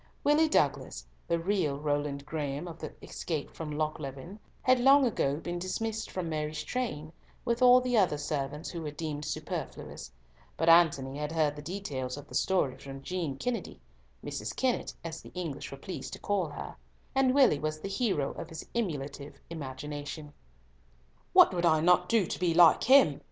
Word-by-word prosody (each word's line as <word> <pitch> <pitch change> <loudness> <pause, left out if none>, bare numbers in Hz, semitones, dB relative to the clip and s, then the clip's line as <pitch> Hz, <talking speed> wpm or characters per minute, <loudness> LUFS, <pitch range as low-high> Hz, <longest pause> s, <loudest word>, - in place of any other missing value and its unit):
Willie 310 +2 +4
Douglas 140 - 0 0.2
(the 170 - +2
real 165 -5 0
Roland 145 -1 -2
Graeme 150 +1 -3
of 165 -1 -9
the - - -6
escape 155 -4 -4
from 160 -2 -6
Lochleven) 150 +3 -4 0.2
had 255 0 +4
long 270 +2 +6
ago 140 - +1
been 175 +2 -4
dismissed 220 +5 -3
from 185 -2 -4
Mary's 155 -1 -3
train, 160 -12 -3 0.3
with 235 0 0
all 250 0 +8
the 250 -1 -1
other 180 -7 +2
servants 145 0 -3
who 170 - -5
were 155 - -4
deemed 150 0 -5
superfluous; 150 - -5 0.5
but 165 - 0
Antony 145 -5 +4
had 150 +1 -3
heard 155 -3 +1
the 145 - -8
details 145 -7 -4
of 145 0 -10
the - - -14
story 180 -9 +1
from 135 0 -9
Jean 165 -5 -3
Kennedy 245 - -3 0.5
(Mrs. - - -4
Kennett, 255 -2 0
as 165 -1 -6
the - - -12
English 165 -6 -4
were 135 - -8
pleased 180 +6 -7
to - - -7
call 200 -4 0
her), - - -8 0.4
and 265 -1 +3
Willie 260 - +5
was 155 +1 -2
the 175 - -5
hero 195 - 0
of - - -8
his 160 0 -7
emulative 145 -9 -4
imagination. 145 0 -6 1.0
"What - - +7
would 175 -1 -1
I 160 -2 +4
not 180 +2 +4
do 225 -5 +3
to - - -4
be 170 -2 +1
like 170 -2 +7
him!" 260 - +6
160 Hz, 175 wpm, -30 LUFS, 145-190 Hz, 1.0 s, all